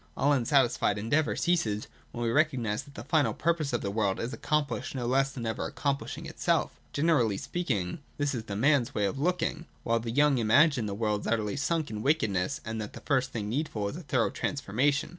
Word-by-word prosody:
All 145 +2 +3
unsatisfied 120 -5 +2
endeavour 140 +9 +1
ceases, 110 -12 0 0.3
when 120 - -4
we 115 - +1
recognise 125 -7 +1
that 140 - -16
the - - -7
final 150 0 +2
purpose 165 -4 0
of 120 - -1
the 100 - -2
world 100 -2 0
is 120 +4 -3
accomplished 150 -2 -1
no 125 -2 -2
less 135 +2 +2
than 125 -4 -6
ever 110 - -2
accomplishing 140 -1 -3
itself. - - 0 0.2
Gene 160 +4 +1
rally 115 -10 +2
speaking, 120 - -2 0.2
this 145 -1 0
is 115 -3 -4
the 100 - -5
man's 130 +2 +2
way 105 - +2
of 100 +7 -2
looking; 170 0 -1 0.2
while 115 0 +1
the 115 0 -5
young 140 +2 +3
imagine 120 +2 +4
that 100 - -3
the - - -4
world 105 -1 0
is - - -6
utterly 110 -1 0
sunk 155 +1 -1
in 105 -1 -4
wickedness, 110 -10 +1
and 110 0 -3
that 105 - -6
the - - -9
first 130 -2 +1
thing 105 -3 -3
needful 110 -4 -2
is - - -7
a 175 - -6
thorough 130 -6 +1
transformation. 140 +2 0
125 Hz, 215 wpm, -29 LUFS, 110-145 Hz, 0.3 s, imagine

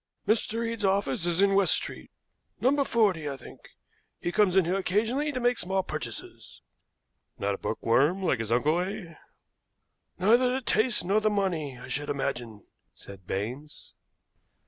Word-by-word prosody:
"Mr. 225 +1 +1
Eade's 230 -2 -4
office 190 -5 +1
is 175 +2 +1
in 200 0 +4
West 195 -1 +5
Street - - -5 0.5
No. 280 +3 +3
40, 195 - +1
I 140 - -5
think. - - -13 0.6
He 175 - -2
comes 195 -2 +3
in 190 - +5
here 175 - 0
occasionally 225 +10 0
to 260 - -3
make 245 0 +1
small 190 +1 0
purchases." - - -7 0.7
"Not 100 0 -1
a - - -6
bookworm 145 - +1
like 135 -9 +1
his 115 -1 -4
uncle, 150 +8 +2
eh?" 185 -2 -5 1.0
"Neither 235 +7 +4
the 260 +1 -1
taste 235 -3 +2
nor 200 +4 +2
the 215 - +2
money, 175 -10 -1
I 125 - -10
should 145 +2 -3
imagine," 120 -6 -4 0.3
said 95 -2 -12
Baines. 125 +10 -5
190 Hz, 155 wpm, -28 LUFS, 145-215 Hz, 1.0 s, West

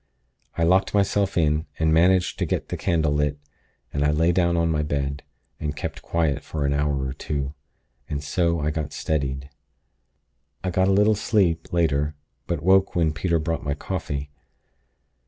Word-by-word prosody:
I 85 - +2
locked 95 +4 +3
myself 100 -1 +1
in, 75 -1 +2
and 80 -1 +2
managed 90 +2 +3
to - - 0
get - - -2
the - - -2
candle 80 -3 +1
lit; 75 0 0 0.6
then 70 - 0
I 75 - +3
lay 80 +3 +3
down 85 -1 +2
on 85 -1 +2
my 75 -1 +1
bed, 70 -1 -2 0.4
and 75 -1 -3
kept - - -5
quiet 80 -4 0
for 75 -3 -3
an 70 - +1
hour 70 -2 0
or 65 - -3
two, 70 -1 -3 0.6
and 75 -1 -3
so 85 +1 +1
I 75 +1 0
got 75 -2 -4
steadied. 70 -2 -2 1.1
"I 90 - -1
got 95 +2 +2
a - - +3
little 105 +2 +4
sleep, 95 -6 +1
later; 75 -3 +1 0.3
but 85 -4 -2
woke 95 +1 +4
when 80 -3 +2
Peter 85 +2 0
brought 80 +1 -2
my 70 -1 -1
coffee. 75 -4 -4
80 Hz, 175 wpm, -24 LUFS, 75-85 Hz, 1.1 s, little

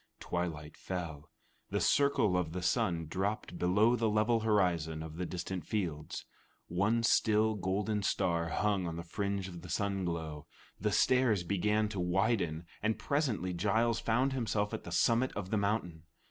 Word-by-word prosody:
Twilight 80 -4 -4
fell. 85 -5 -5 0.4
The - - 0
circle 140 -9 +3
of 85 -3 -1
the 90 0 -4
sun 85 -1 +1
dropped 95 +1 -3
below 105 +7 +4
the 115 -2 +1
level 110 +2 +2
horizon 90 -8 +1
of 80 0 -8
the 90 -1 -2
distant 90 0 -4
fields. 80 -6 -3 0.4
One 100 +7 +1
still 110 0 +3
golden 105 +2 -1
star 85 -3 0
hung 100 -1 0
on 80 - -4
the 85 - -5
fringe 100 +2 -2
of 85 -2 -9
the 90 - -10
sun 100 +2 -1
glow. 80 -4 -4 0.3
The 105 +2 0
stairs 125 -7 +3
began 105 +4 +1
to 100 -3 -4
widen, 90 -2 0 0.2
and 110 +1 +1
presently 115 - -1
Giles 110 +6 +1
found 125 +4 +1
himself 110 -5 -1
at - - -5
the 85 - -7
summit 115 +8 +2
of 95 -2 -5
the 110 - +2
mountain. 100 -5 -1
95 Hz, 160 wpm, -32 LUFS, 85-110 Hz, 0.4 s, below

